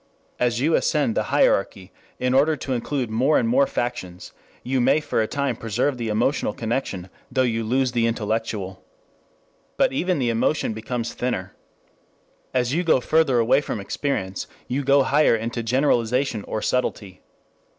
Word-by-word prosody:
As 120 -1 +1
you 155 +5 +2
ascend 150 -9 +2
the - - 0
hierarchy 95 -1 +1 0.3
in 125 0 0
order 145 +4 +4
to 135 -1 -4
include 125 -1 -2
more 130 +7 +3
and - - +1
more 270 +4 +3
factions 120 - -4 0.3
you 130 0 0
may 135 - +4
for 150 - -1
a 110 - 0
time 140 -2 -1
preserve 115 +5 -1
the 115 - -2
emotional 110 +2 0
connection 110 -6 -3 0.2
though 130 0 +2
you 115 -2 0
lose 130 +3 +1
the 120 -1 +1
intellectual. 110 -4 -3 0.9
But - - +3
even 180 +5 0
the 125 -4 +1
emotion 115 +1 0
becomes 115 +2 -4
thinner. 95 -7 -3 1.0
As 125 0 0
you 175 +3 +1
go 160 -6 +4
further 150 -1 +2
away 120 +4 +3
from 120 - -4
experience, 100 -3 -3 0.2
you 135 +3 -1
go 140 +1 +4
higher 145 -2 +3
into 115 +1 -3
generalization 125 -1 +1
or 110 - -4
subtlety. 100 -7 -2
125 Hz, 160 wpm, -23 LUFS, 110-140 Hz, 1.0 s, order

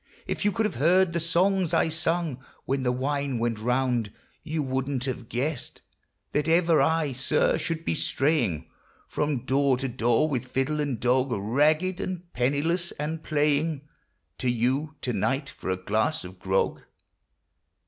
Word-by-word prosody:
If - - -3
you 205 - +3
could 225 +1 0
have 210 - -2
heard 180 +2 +4
the 170 - +1
songs 180 +2 +2
I - - +3
sung 160 -4 -1 0.2
When 135 +1 0
the 125 -1 +1
wine 140 +1 -1
went 115 -1 -1
round, 125 -2 0 0.3
you 155 -1 -2
wouldn't 130 0 -1
have 125 -3 -4
guessed 135 +2 -3 0.5
That 150 +1 0
ever 165 -2 +4
I, 160 0 +2
sir, 130 +1 +1
should 165 +1 -3
be - - +1
straying 135 - 0 0.4
From 145 -4 -1
door 135 -1 +3
to 135 +1 -2
door, 120 +3 +2
with 130 -4 -2
fiddle 135 +4 -1
and 140 -6 -1
dog, 130 +2 +2
Ragged 150 - +1
and 180 -2 -5
penniless, 145 +8 0
and 155 +2 -4
playing 150 0 +1 0.6
To 130 - 0
you 130 +6 0
to 125 - -2
night 135 +3 0
for - - -7
a 95 - 0
glass 110 +11 0
of 90 0 -10
grog 95 +1 0
140 Hz, 160 wpm, -26 LUFS, 125-160 Hz, 0.6 s, heard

